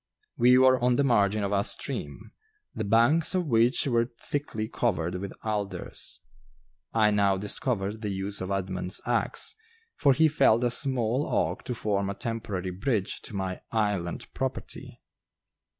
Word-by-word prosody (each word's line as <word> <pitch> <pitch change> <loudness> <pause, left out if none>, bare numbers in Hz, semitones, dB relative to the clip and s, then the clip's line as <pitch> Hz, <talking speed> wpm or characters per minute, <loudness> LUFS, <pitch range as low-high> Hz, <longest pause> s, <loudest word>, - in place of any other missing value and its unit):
We 125 +1 +6
were 130 0 +5
on 125 0 +3
the 140 - +2
margin 105 -5 +2
of 100 - -1
a 100 -1 +2
stream, - - -4 0.4
the 110 - -3
banks 120 - +3
of 180 -1 +1
which 120 -1 +3
were 120 -3 +1
thickly 125 -7 -3
covered 90 -8 -1
with 95 +1 -4
alders. 105 -2 -4 0.7
I 110 -2 +3
now 100 -2 +3
discovered 105 +1 -2
the 105 - -2
use 100 +1 -3
of 95 - -4
Edmund's 95 -1 -2
axe, - - 0 0.4
for 140 -3 +4
he 160 +4 +4
felled 125 -6 +3
a 120 - +2
small 130 0 +1
oak - - 0
to 125 - -3
form 100 -3 -1
a 100 - -3
temporary 105 -6 -3
bridge 100 +1 -1
to 105 - -7
my 95 -1 -3
"Island" 105 -6 -1
property. - - -5
110 Hz, 150 wpm, -27 LUFS, 100-125 Hz, 0.7 s, We